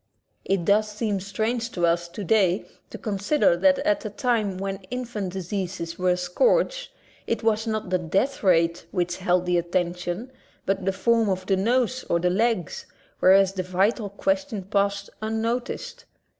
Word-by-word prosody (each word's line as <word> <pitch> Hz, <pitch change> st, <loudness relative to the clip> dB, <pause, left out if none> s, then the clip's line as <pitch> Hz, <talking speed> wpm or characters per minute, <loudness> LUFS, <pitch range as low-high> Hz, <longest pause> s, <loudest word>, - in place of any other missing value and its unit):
It 190 Hz, -3 st, 0 dB
does 210 Hz, +2 st, +3 dB
seem 210 Hz, -2 st, -1 dB
strange 220 Hz, +5 st, -2 dB
to 175 Hz, -2 st, +1 dB
us 170 Hz, 0 st, +1 dB
today 195 Hz, -1 st, +1 dB, 0.2 s
to -, -, -8 dB
consider 205 Hz, -, +1 dB
that 185 Hz, +1 st, +4 dB
at 205 Hz, -, +2 dB
a 215 Hz, -, -3 dB
time 210 Hz, -3 st, 0 dB
when 195 Hz, 0 st, -4 dB
infant 235 Hz, -7 st, -4 dB
diseases 185 Hz, -2 st, -4 dB
were 180 Hz, 0 st, +2 dB
a 180 Hz, -, +2 dB
scourge, -, -, +1 dB, 0.4 s
it 230 Hz, -1 st, -1 dB
was 220 Hz, 0 st, +1 dB
not 215 Hz, -4 st, -2 dB
the 185 Hz, -, +2 dB
death 195 Hz, -, 0 dB
rate 170 Hz, -3 st, +2 dB
which 175 Hz, -2 st, -1 dB
held 180 Hz, -1 st, +1 dB
the 180 Hz, -1 st, +2 dB
attention, 175 Hz, +6 st, -2 dB, 0.3 s
but 195 Hz, -1 st, -1 dB
the 195 Hz, -, +2 dB
form 225 Hz, +3 st, +2 dB
of 185 Hz, -1 st, -2 dB
the 195 Hz, -, +2 dB
nose 245 Hz, +5 st, +1 dB
or 170 Hz, -, +2 dB
the 180 Hz, +1 st, +1 dB
legs, 215 Hz, -3 st, 0 dB, 0.3 s
whereas 190 Hz, +1 st, +5 dB
the 190 Hz, -, -2 dB
vital 195 Hz, +4 st, 0 dB
question 280 Hz, 0 st, -1 dB
passed 200 Hz, +1 st, -1 dB
un 220 Hz, +1 st, -2 dB
noticed. 235 Hz, +2 st, -3 dB
195 Hz, 165 wpm, -25 LUFS, 180-225 Hz, 0.4 s, whereas